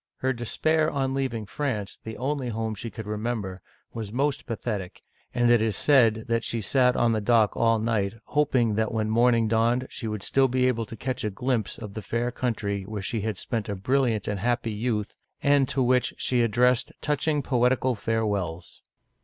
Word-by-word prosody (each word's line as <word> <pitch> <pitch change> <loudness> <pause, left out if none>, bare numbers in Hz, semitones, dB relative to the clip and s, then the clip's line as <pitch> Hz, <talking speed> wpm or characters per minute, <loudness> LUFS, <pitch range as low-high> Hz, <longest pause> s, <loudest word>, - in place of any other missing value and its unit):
Her 130 0 0
despair 155 +6 +1
on 135 -3 -1
leaving 130 -5 -2
France, 105 -3 -3
the 110 0 -7
only 135 -1 -2
home 110 -1 -2
she 115 +3 -6
could 110 -1 -8
remember, 105 -3 -3 0.3
was 110 -3 -5
most 140 +4 -1
pathetic, 105 -5 -4 0.3
and 120 -1 +3
it 120 -2 +5
is 110 -2 0
said 115 -6 +4 0.2
she 115 - -2
sat 125 +4 +3
on 120 -1 +3
deck 110 -1 +3
all 115 -1 +3
night, 110 -2 0
hoping 130 -7 +2
that 110 +1 0
when 110 -1 -1
morning 115 0 +4
dawned 115 +3 +2
she 115 - -5
would 105 -2 -4
still 135 -1 +3
be 130 0 +2
able 115 -3 -1
to 115 - -8
catch 130 +3 -3
a 105 - 0
glimpse 110 -1 -2
of 105 -3 -8
the 110 - -5
fair 120 +3 -2
coun 125 -1 -1
try 100 -1 -3
where 100 +1 -6
she 110 +2 -2
had 110 -1 -2
spent 110 0 -3
a 100 - -2
brilliant 115 +1 +1
and 105 -2 -2
happy 120 +2 0
youth, 105 -1 -2 0.3
and 140 -2 +4
to 135 -1 +1
which 125 0 +2
she 125 -2 +1
addressed 120 +2 +2
touching 150 0 0
poetical 125 0 +2
farewells. 105 -7 -2
115 Hz, 185 wpm, -26 LUFS, 110-125 Hz, 0.3 s, it